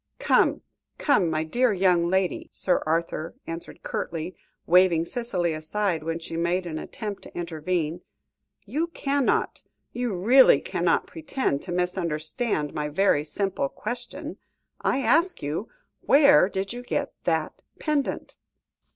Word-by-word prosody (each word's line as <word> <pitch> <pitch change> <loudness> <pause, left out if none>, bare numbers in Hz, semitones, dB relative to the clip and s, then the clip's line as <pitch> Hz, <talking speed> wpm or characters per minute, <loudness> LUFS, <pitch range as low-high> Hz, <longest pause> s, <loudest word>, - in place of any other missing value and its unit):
"Come, - - +2 0.3
come, 240 - +3
my 155 0 0
dear 240 +8 +2
young 180 -3 +3
lady," 190 0 0
Sir 180 - +2
Arthur 165 0 -1
answered 165 +1 -7
curtly, 165 +2 -4 0.3
waving 175 -2 +4
Cicely 180 -6 -1
aside, 165 +2 -1
when 165 +1 -2
she 165 0 -7
made 170 +2 0
an 155 -2 -4
attempt 210 -3 -6
to - - -11
intervene. 170 0 -2 0.6
"You 320 +4 -1
cannot 280 -5 0 0.3
you 245 -4 -2
really 255 +8 +7
cannot, - - 0
pretend 275 - -2
to - - -7
misunderstand 175 - -1
my 150 0 -2
very 150 -2 +2
simple 185 -3 -2
question. 240 - -6 0.4
I 270 - +1
asked 330 - +2
you 150 +9 -3 0.4
where 280 -8 +6
did 195 +2 -3
you 245 - -6
get 280 +3 -2
that 160 -2 -1 0.2
pendant?" 300 -2 -2
180 Hz, 130 wpm, -25 LUFS, 165-240 Hz, 0.6 s, really